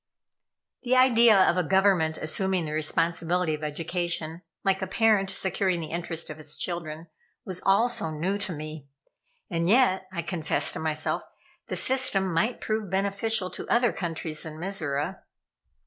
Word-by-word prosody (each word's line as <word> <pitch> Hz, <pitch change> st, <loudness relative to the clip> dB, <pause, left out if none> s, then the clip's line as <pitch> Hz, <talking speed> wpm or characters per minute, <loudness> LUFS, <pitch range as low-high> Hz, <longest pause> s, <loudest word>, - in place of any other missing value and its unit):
The 255 Hz, 0 st, +1 dB
idea 235 Hz, -4 st, +6 dB
of 185 Hz, -1 st, +4 dB
a 180 Hz, -, +2 dB
Government 185 Hz, -3 st, +3 dB
assuming 185 Hz, +2 st, -1 dB
the 150 Hz, -, -5 dB
responsibility 165 Hz, +2 st, 0 dB
of 155 Hz, 0 st, -5 dB
education, 165 Hz, +1 st, -3 dB, 0.2 s
like 195 Hz, -1 st, +1 dB
a 190 Hz, -, -2 dB
parent 210 Hz, -1 st, +3 dB
securing 190 Hz, -2 st, 0 dB
the 160 Hz, -, -6 dB
interest 165 Hz, -1 st, -3 dB
of 155 Hz, -, -9 dB
its 150 Hz, -1 st, -6 dB
children, 165 Hz, -2 st, -4 dB, 0.4 s
was 185 Hz, -2 st, -3 dB
all 200 Hz, +5 st, +5 dB
so 240 Hz, -9 st, -1 dB
new 175 Hz, +6 st, -2 dB
to 200 Hz, -, -3 dB
me; 155 Hz, -2 st, -7 dB, 0.6 s
and 170 Hz, 0 st, -1 dB
yet, 200 Hz, -5 st, +4 dB
I 170 Hz, -2 st, -3 dB
confessed 170 Hz, -2 st, 0 dB
to -, -, -2 dB
myself, 155 Hz, -1 st, -1 dB, 0.5 s
the -, -, -3 dB
system 205 Hz, -9 st, +1 dB
might 220 Hz, +9 st, 0 dB
prove 215 Hz, -2 st, -2 dB
beneficial 200 Hz, +1 st, 0 dB
to -, -, -7 dB
other 240 Hz, -1 st, +3 dB
countries 165 Hz, -3 st, -4 dB
than 155 Hz, -1 st, -8 dB
Mizora. 165 Hz, -2 st, -3 dB
180 Hz, 155 wpm, -27 LUFS, 160-195 Hz, 0.6 s, idea